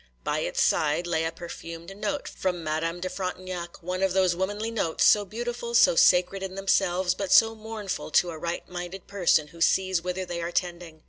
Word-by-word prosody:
By - - -1
its - - -2
side 155 +3 +2
lay 165 -2 0
a 165 - -1
perfumed 170 +1 -9
note 285 +8 -3
from 180 -3 -3
Madame 165 +3 -2
de 185 - -2
Frontignac,—one 185 -1 -5
of 190 -2 +2
those 185 -2 +3
womanly 205 +5 -2
notes, 200 -8 0
so 205 -1 +5
beautiful, 235 +3 -4
so 230 - +6
sacred 180 +3 +4
in 190 -1 -5
themselves, 190 -2 +1
but 195 -2 -4
so 225 0 +6
mournful 215 -5 -5
to 175 +3 +3
a 160 - -8
right 170 +2 -4
minded 180 +1 -7
person 175 -6 +2
who 170 +1 -14
sees 185 0 +2
whither 180 +1 -3
they 175 -1 -4
are 170 +1 -3
tending. 175 -3 -3
180 Hz, 190 wpm, -26 LUFS, 170-195 Hz, -, so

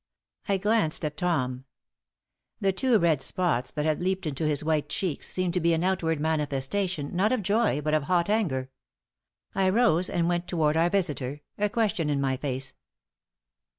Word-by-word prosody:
I 200 - +3
glanced 205 -6 +1
at 150 -1 -3
Tom. 130 -8 -1 0.9
The 195 -1 +1
two 250 +3 +3
red 165 -7 +2
spots 150 -8 0
that 150 -1 -3
had 155 +1 0
leaped 190 0 -1
into 155 +1 -1
his 150 -1 0
white 155 -2 0
cheeks 180 -5 -2
seemed 185 -2 -1
to 180 - +1
be 170 0 +3
an 160 - -1
outward 170 -4 0
manifestation, 150 +2 -1
not 195 +4 +2
of 250 -5 0
joy 205 -5 +2
but 150 +1 -1
of 155 -2 +2
hot 175 +1 +2
anger. 150 -12 0 0.8
I 190 -1 +2
rose 185 -5 +3
and 170 -1 0
went 175 0 -1
toward 155 -4 +1
our 165 +2 +3
visitor, 150 -7 -1 0.2
a 210 0 +2
question 205 -7 0
in 145 -1 +1
my 135 -1 +1
face. 135 -1 -3
165 Hz, 175 wpm, -27 LUFS, 150-190 Hz, 0.9 s, I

